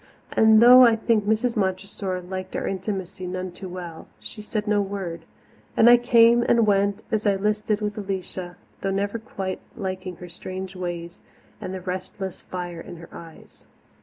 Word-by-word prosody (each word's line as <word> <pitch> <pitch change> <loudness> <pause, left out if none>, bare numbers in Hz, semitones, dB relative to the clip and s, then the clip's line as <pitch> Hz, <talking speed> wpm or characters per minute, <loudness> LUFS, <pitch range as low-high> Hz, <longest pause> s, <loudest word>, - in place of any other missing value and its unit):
And 220 0 +6
though 250 +1 +10
I 230 -2 +6
think 225 -2 +1
Mrs. 220 +3 +1
Montressor 190 -1 -2
liked 185 +1 -6
our - - -2
intimacy 190 -1 -4
none 185 0 -4
too 185 +1 -9
well, 175 -3 -8
she 215 - -8
said 210 0 -3
no 210 -1 +2
word, 190 -5 -5 0.5
and 225 - +6
I 240 0 +9
came 235 -1 +5
and 235 -1 +3
went 200 -1 +2
as 215 -1 0
I 200 - +4
listed 210 +1 0
with 210 0 -2
Alicia, 185 -2 -5 0.2
though 195 - -1
never 200 +3 -1
quite 190 -3 -5 0.2
liking 185 -3 -4
her 180 - -10
strange 185 +2 -7
ways 175 -1 -5 0.4
and 185 - -5
the 190 -1 -5
restless 185 +1 -5
fire 175 -2 -6
in - - -9
her 170 0 -12
eyes. 165 -1 -13
195 Hz, 170 wpm, -24 LUFS, 185-215 Hz, 0.5 s, though